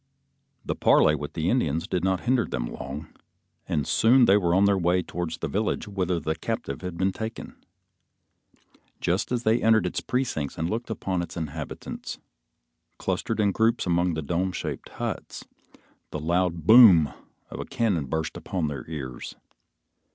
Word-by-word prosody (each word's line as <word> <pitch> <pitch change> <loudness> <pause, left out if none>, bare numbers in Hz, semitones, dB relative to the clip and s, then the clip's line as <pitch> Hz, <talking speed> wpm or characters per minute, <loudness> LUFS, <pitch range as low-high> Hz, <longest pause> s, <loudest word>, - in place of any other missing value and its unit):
The - - -1
parley 75 - +4
with 75 -1 -4
the 80 0 -2
Indians 80 - +1
did 90 -1 -1
not 95 -1 +1
hinder 125 -1 +2
them - - -3
long, 70 +5 -7 0.5
and 75 - 0
soon 120 +2 +5
they 100 - +5
were 90 -4 +2
on 100 +2 +5
the 100 0 +4
way 90 0 +1
towards 85 -2 -4
the 85 - -3
village 105 +7 -1
whither 95 -4 -1
the 80 0 -1
captive 110 +8 -4
had 90 -2 -6
been 95 +2 +1
taken. 110 +3 -6 1.4
Just 90 +7 -1
as 120 -1 -1
they 110 +1 +2
entered 110 -1 +4
its - - -2
precincts 120 - -2
and 80 - -1
looked 115 +2 -3
upon 95 -4 -2
its 85 0 -7
inhabitants, 80 -2 -6 0.8
clustered 110 -1 -2
in 100 -2 +3
groups 115 +4 +1
among 90 -1 +1
the 80 - -3
dome 90 +5 -1
shaped - - -5
huts, - - -5 0.6
the 75 - -5
loud 85 0 0
boom 95 - +8 0.4
of - - -7
a - - -4
cannon 95 -11 0
burst 80 +3 -2
upon 85 -5 -2
their 75 +2 -7
ears. 65 -6 -6
90 Hz, 165 wpm, -26 LUFS, 80-110 Hz, 1.4 s, boom